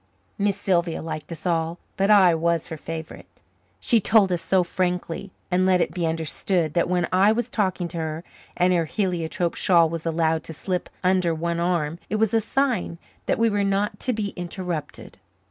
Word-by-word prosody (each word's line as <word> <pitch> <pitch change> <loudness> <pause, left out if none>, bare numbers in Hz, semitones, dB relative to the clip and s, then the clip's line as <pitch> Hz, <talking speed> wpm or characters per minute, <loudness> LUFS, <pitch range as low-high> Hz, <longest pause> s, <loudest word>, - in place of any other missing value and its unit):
Miss 200 -1 +1
Sylvia 175 -4 +1
liked 155 -1 -6
us 160 0 -6
all, 165 -1 0 0.2
but 195 +1 +1
I 190 -5 +7
was 165 0 0
her 160 - -4
favourite. 160 +1 -7 0.5
She 235 - +3
told 205 -2 +4
us 175 -1 0
so 190 -2 +2
frankly 180 +1 -2 0.2
and 180 +1 +3
let 185 -1 +4
it - - 0
be 175 -3 -1
understood 160 +1 -1
that 170 0 +1
when 180 -1 +1
I 195 +3 +5
was 240 +2 -1
talking 185 -4 0
to 170 - -5
her 160 +1 -4 0.3
and 180 +1 +3
her 170 -2 +2
heliotrope 175 -2 -1
shawl 170 -3 +4
was 165 0 -5
allowed 160 -1 +1
to 160 - -6
slip 180 +3 -3
under 180 -2 +2
one 170 +1 -2
arm 170 -2 0
it - - -1
was 215 0 +1
a 225 - +3
sign 235 -7 0 0.3
that - - +1
we 230 - +3
were 205 -2 +1
not 200 +1 0
to 255 - 0
be 215 -3 -2
interrupted. 175 -3 -6
180 Hz, 190 wpm, -24 LUFS, 165-195 Hz, 0.5 s, I